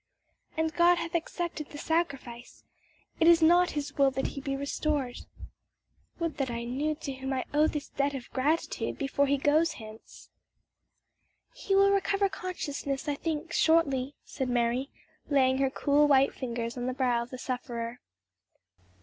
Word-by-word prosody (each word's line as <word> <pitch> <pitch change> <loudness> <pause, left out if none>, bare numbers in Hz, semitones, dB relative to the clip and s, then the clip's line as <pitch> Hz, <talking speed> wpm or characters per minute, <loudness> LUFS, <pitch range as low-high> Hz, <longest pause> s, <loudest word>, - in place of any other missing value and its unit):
"And 320 0 0
God 345 +2 +5
hath 335 0 -4
accepted 335 -2 -3
the 290 - -9
sacrifice; 280 -7 -3 0.6
it 325 - +4
is 340 -1 +7
not 350 +2 +5
his 290 0 -4
will 275 -1 +6
that 265 0 -3
he 275 - -7
be 275 -1 -2
restored. 280 -2 -2 1.0
Would 335 -2 -3
that 275 -2 -1
I 235 0 -3
knew 280 +6 -1
to 285 -3 -6
whom 265 +1 -5
I 260 - -2
owe 300 +1 +4
this 300 -1 -4
debt 280 0 -1
of 255 -3 -6
gratitude 295 +5 -1
before 280 0 +1
he 280 +1 +2
goes 310 +4 +2
hence." 220 -1 -13 1.2
"He 390 - -1
will 395 0 +5
recover 395 0 +2
consciousness, 290 -7 -4
I 290 - +1
think, 320 +2 -4
shortly," 285 -5 +2
said 265 -2 -4
Mary, 245 +2 0 0.4
laying 265 -2 +3
her 270 -1 +2
cool 290 +2 +3
white 275 -1 +4
fingers 235 -2 -4
on 245 0 -3
the 255 - -1
brow 250 -2 +1
of 235 - -7
the 255 - -7
sufferer. 245 -2 -4
280 Hz, 160 wpm, -29 LUFS, 255-320 Hz, 1.2 s, is